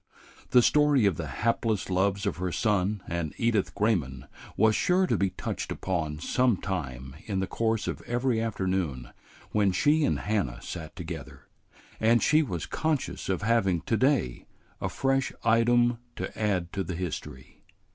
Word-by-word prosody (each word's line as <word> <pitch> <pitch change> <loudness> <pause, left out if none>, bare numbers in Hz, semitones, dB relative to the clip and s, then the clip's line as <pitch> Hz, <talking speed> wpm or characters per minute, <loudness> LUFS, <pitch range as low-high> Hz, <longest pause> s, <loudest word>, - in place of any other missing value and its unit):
The 125 - +6
story 150 -5 +4
of 95 -5 +2
the 85 - -4
hapless 110 +6 0
loves 95 +1 +1
of - - -1
her 90 0 -2
son 105 -1 0
and 85 -3 -3
Edith 115 -4 +1
Grayman 80 - 0 0.3
was 110 +1 +4
sure 185 +1 +3
to - - +1
be 100 - +1
touched 90 - -5
upon 80 -5 -2
some 120 +7 +2
time 65 -9 -5
in 100 -3 -1
the 95 - 0
course 110 +2 -1
of - - -3
every 120 -1 +1
afternoon 95 - -2 0.4
when 100 -2 +3
she 150 - +3
and 145 - +2
Hannah 100 - -1
sat 80 -2 -7
together, 75 -6 -8 0.5
and 115 +2 +4
she 155 +1 +5
was 90 - -3
conscious 155 -10 -2
of 95 +2 -1
having 100 -6 +2
to 115 - 0
day 130 - +1 0.3
a - - -1
fresh 135 0 0
item 120 +1 +3 0.2
to - - -5
add 95 -5 -1
to 100 - -1
the 90 0 -5
history. 75 -6 -6
100 Hz, 160 wpm, -28 LUFS, 85-115 Hz, 0.5 s, The